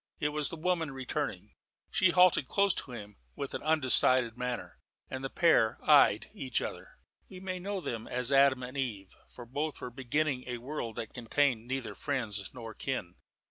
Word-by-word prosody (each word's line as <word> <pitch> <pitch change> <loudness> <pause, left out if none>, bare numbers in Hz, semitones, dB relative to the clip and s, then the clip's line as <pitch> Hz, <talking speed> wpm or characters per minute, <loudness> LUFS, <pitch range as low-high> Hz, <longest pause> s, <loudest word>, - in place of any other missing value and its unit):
It 150 - +1
was 150 -1 0
the - - -5
woman 165 -1 0
returning. 135 -1 -4 0.4
She 185 - +4
halted 180 -6 +5
close 200 +3 +3
to 130 - -5
him 105 -3 -9 0.2
with 140 - -5
an - - -3
undecided 130 -5 +3
manner, 125 -1 -4 0.3
and 130 0 -4
the 135 - -2
pair 120 -11 +3
eyed - - +6
each - - -1
other. - - -7 0.3
We 185 - -9
may 185 -1 -4
know 195 +1 -3
them 115 -8 -4
as 125 +1 -1
Adam 135 -2 +5
and 125 +2 -7
Eve, 110 -8 -3 0.2
for 120 - -11
both 145 +5 -3
were 125 - -6
beginning 135 +1 -1
a 125 -1 -3
world 120 -2 -5
that 110 - -5
contained 120 -1 +1
neither 130 -1 -3
friends 110 -8 -2
nor 115 -3 -8
kin. 120 -12 -3
130 Hz, 180 wpm, -31 LUFS, 120-150 Hz, 0.4 s, eyed